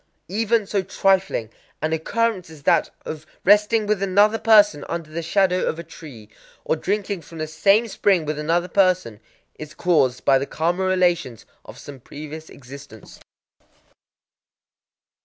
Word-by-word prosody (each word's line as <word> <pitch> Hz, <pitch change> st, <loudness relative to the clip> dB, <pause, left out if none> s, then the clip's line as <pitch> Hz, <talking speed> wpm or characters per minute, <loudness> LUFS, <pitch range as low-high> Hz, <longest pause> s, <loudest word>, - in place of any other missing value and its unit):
Even 225 Hz, +2 st, 0 dB
so 200 Hz, 0 st, -1 dB
trifling 190 Hz, -, 0 dB, 0.3 s
an 155 Hz, +1 st, -2 dB
occurrence 190 Hz, +3 st, -1 dB
as 155 Hz, -3 st, -14 dB
that -, -, +2 dB, 0.2 s
of 155 Hz, 0 st, -7 dB, 0.2 s
resting 210 Hz, +2 st, +4 dB
with 210 Hz, -2 st, -1 dB
another 205 Hz, +3 st, +3 dB
person 205 Hz, -9 st, +4 dB
under 165 Hz, -2 st, -5 dB
the 165 Hz, +2 st, -4 dB
shadow 185 Hz, +2 st, +1 dB
of 160 Hz, -, -2 dB
a 170 Hz, -, -7 dB
tree, 130 Hz, -10 st, -13 dB, 0.4 s
or -, -, +1 dB
drinking 200 Hz, +2 st, -3 dB
from 160 Hz, +2 st, -13 dB
the 155 Hz, -, -3 dB
same 195 Hz, +8 st, +2 dB
spring 195 Hz, -5 st, +1 dB
with 150 Hz, 0 st, -3 dB
another 170 Hz, +4 st, 0 dB
person, 185 Hz, -, +1 dB, 0.4 s
is 155 Hz, 0 st, -9 dB
caused 135 Hz, -8 st, +1 dB
by 135 Hz, -1 st, +4 dB
the 140 Hz, -, -4 dB
karma 175 Hz, +4 st, -1 dB
relations 175 Hz, -, 0 dB, 0.2 s
of -, -, -12 dB
some 140 Hz, -2 st, -11 dB
previous 155 Hz, +4 st, -10 dB
existence. 135 Hz, -4 st, -13 dB
170 Hz, 145 wpm, -22 LUFS, 155-195 Hz, 0.4 s, resting